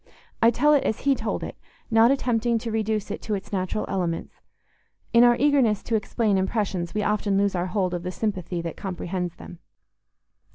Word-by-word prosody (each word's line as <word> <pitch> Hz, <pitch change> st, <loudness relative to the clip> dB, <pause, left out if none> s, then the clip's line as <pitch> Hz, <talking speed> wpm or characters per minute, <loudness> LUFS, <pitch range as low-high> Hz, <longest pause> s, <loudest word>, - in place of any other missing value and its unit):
I 230 Hz, -, +7 dB
tell 295 Hz, +6 st, +3 dB
it 285 Hz, -, +3 dB
as 220 Hz, -, -1 dB
he 280 Hz, -, +3 dB
told -, -, -3 dB
it, -, -, -6 dB, 0.4 s
not 225 Hz, +1 st, +6 dB
attempting 240 Hz, -3 st, +1 dB
to 225 Hz, 0 st, -4 dB
reduce 215 Hz, -1 st, -1 dB
it -, -, -5 dB
to 215 Hz, -, -2 dB
its 195 Hz, +1 st, -8 dB
natural 185 Hz, +2 st, -1 dB
elements—in 190 Hz, +5 st, -2 dB
our 240 Hz, 0 st, +6 dB
eagerness 265 Hz, -7 st, +3 dB
to 230 Hz, -, -1 dB
explain 210 Hz, -1 st, +1 dB
impressions, 190 Hz, -3 st, -2 dB
we 210 Hz, -, 0 dB
often 205 Hz, -1 st, +1 dB
lose 200 Hz, 0 st, +2 dB
our 180 Hz, 0 st, -1 dB
hold 185 Hz, -1 st, -1 dB
of 175 Hz, -, -2 dB
the 180 Hz, +1 st, -4 dB
sympathy 185 Hz, -4 st, -3 dB
that 165 Hz, -, -5 dB
comprehends 180 Hz, -2 st, -4 dB
them. 175 Hz, -, -11 dB
210 Hz, 180 wpm, -25 LUFS, 185-230 Hz, 0.4 s, I